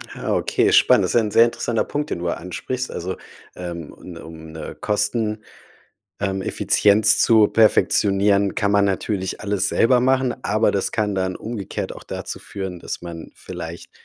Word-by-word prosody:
Ah. - - -2
Okay, - - +1
spannend. - - +5
Das - - -2
ist - - +7
ein 105 -2 -3
sehr 115 +3 +6
interessanter 120 -1 -1
Punkt, 145 +1 -3
den - - -3
du 85 0 -2
ansprichst. 120 +10 -4
Also, 95 +2 -4 0.4
ähm, 85 -3 -7
un 85 -2 -11
um 80 -1 -11
'ne 80 0 -8
Kosten, 105 +1 -1 0.8
ähm, 95 -1 -1
Effizienz 105 +2 +3
zu 110 -2 +5
perfektionieren, 100 -2 +3
kann 100 - 0
man 100 0 +4
natürlich 95 0 -2
alles 100 -2 -1
selber 125 +1 +3
machen, 130 0 +2
aber 110 +2 +2
das 100 - -1
kann 105 -2 0
dann 95 -1 -1
umgekehrt 110 -3 -5
auch - - -11
dazu - - -6
führen, 95 -3 -6
dass - - -6
man 85 -2 -8
vielleicht 85 -2 -8
100 Hz, 165 wpm, -21 LUFS, 90-110 Hz, 0.8 s, ist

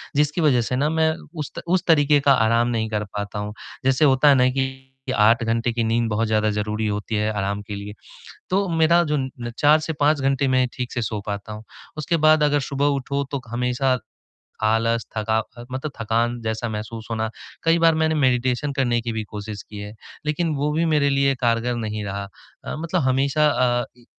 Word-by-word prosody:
जिसकी 150 +3 +1
वजह 140 -6 +4
से 120 +2 -2
मैं 160 0 +2 0.3
उस 150 - -4
त - - -3
उस 180 +1 +2
तरीक़े 145 -3 +5
का 140 0 +4
आराम 115 0 +3
नहीं 115 -2 -1
कर 105 -1 -1
पाता 105 0 -4
हूँ। 105 0 -4 0.3
जैसे 135 +3 +4
होता 135 +1 +5
है 140 - +7
ना 125 -1 +4
कि 130 0 -3 0.3
8 115 +2 +4
घंटे 115 +1 0
की 115 0 0
नींद 115 +1 +1
बहुत 110 +1 0
ज़्यादा 110 0 +2
ज़रूरी 105 +1 -2
होती 105 +1 -3
है 105 +1 0
आराम 100 0 -2
के 105 - -5
लिए। 100 +1 -7 0.6
तो 195 +2 +1
मेरा 165 +1 +4
जो 150 - +2
न 130 -3 -5
4 150 +1 +5
से 155 +1 -3
5 145 +1 +3
घंटे 135 +1 +1
मैं 130 -1 +3
ठीक 125 -1 -5
से 120 - -2
सो 105 -1 -3
पाता 105 +1 -5
हूँ। 105 +1 -9 0.3
उसके 160 +3 0
बाद 155 0 +6
अगर 145 0 +3
सुबह 140 0 -1
उठो 140 +1 -2
तो 140 -2 -3
हमेशा 125 +2 0 0.7
आलस, 115 +1 +1
थका 110 +1 +1 0.2
अ, 120 - -9
मतलब 130 +3 -4
थकान 115 +2 0
जैसा 110 +1 -3
महसूस 110 +1 -6
होना। 110 0 -1 0.3
कई 165 +1 +3
बार 165 -1 +4
मैंने 160 0 +1
मैडिटेशन 130 0 +1
करने 120 -3 +1
की 115 0 -3
भी 110 -1 -2
कोशिश 105 -1 -7
की 105 - -10
है, 105 +1 -7 0.3
लेक़िन 155 +2 0
वो 145 +2 0
भी 165 +2 +1
मेरे 150 -3 +2
लिए 140 0 +2
कारगर 120 0 +1
नहीं 110 -2 -4
रहा। 100 0 -4 0.4
अ, - - -4
मतलब 160 +1 -1
हमेशा 135 +3 +2
अ, 120 -3 +1
ई 120 - -21
125 Hz, 205 wpm, -22 LUFS, 110-145 Hz, 0.7 s, है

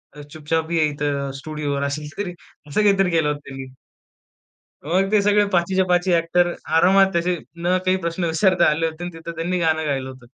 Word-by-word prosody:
अ, 150 - -9
चुपचाप 160 +1 -2
ये 160 -2 +3
इथं 145 -1 -2
स्टुडिओवर." 145 -2 -3
अशी 150 +1 -3
स्क्रिप्ट, 180 +2 -6 0.3
असं 210 - +1
काहीतरी 195 -3 +3
केलं 160 -3 +2
होतं 145 0 -2
त्यांनी. 135 -1 -8 1.1
मग 190 +4 +1
ते 210 -1 +4
सगळे 205 0 +3
पाचीच्या 185 +2 +2
पाची 180 0 +2
ॲक्टर 175 +1 +2 0.2
आरामात 190 +2 +4
असे 175 +1 0 0.3
न 180 +1 +2
काही 185 0 +3
प्रश्न 170 +1 -2
विचारता 175 +2 +3
आले 160 +2 0
होते 160 +2 -7
आणि 175 -1 -6
तिथं 165 +1 -8
त्यांनी 175 +2 -2
गाणं 160 -1 +1
गायलं 135 -2 -2
होतं. 130 -2 -13
165 Hz, 185 wpm, -21 LUFS, 150-180 Hz, 1.1 s, ते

